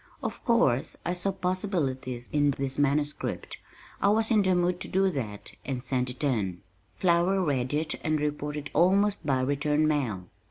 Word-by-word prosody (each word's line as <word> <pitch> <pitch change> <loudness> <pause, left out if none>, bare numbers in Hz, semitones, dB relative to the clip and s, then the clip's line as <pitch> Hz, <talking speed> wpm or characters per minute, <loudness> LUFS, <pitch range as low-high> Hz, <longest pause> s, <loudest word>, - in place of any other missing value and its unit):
Of - - -4
course 145 - +2
I 175 - 0
saw 180 +2 -1
possibilities 160 - -2
in 145 -1 +3
this 135 0 -2
manuscript 145 +1 -1 0.4
I 200 - +4
was 220 +2 +2
in 215 -2 +5
the 185 -2 +2
mood 180 0 +1
to - - -1
do 190 0 +2
that 110 - -4
and 130 -2 -4
sent 125 -1 0
it 125 +3 -6
in. 105 -10 0 0.3
Flower 175 +2 +2
read 130 -5 0
it 155 +1 -1
and 155 -2 +1
reported 150 0 -3
almost 195 +5 +3
by 130 -2 +2
return 145 +3 +1
mail. 125 -12 -1
150 Hz, 165 wpm, -28 LUFS, 130-180 Hz, 0.4 s, in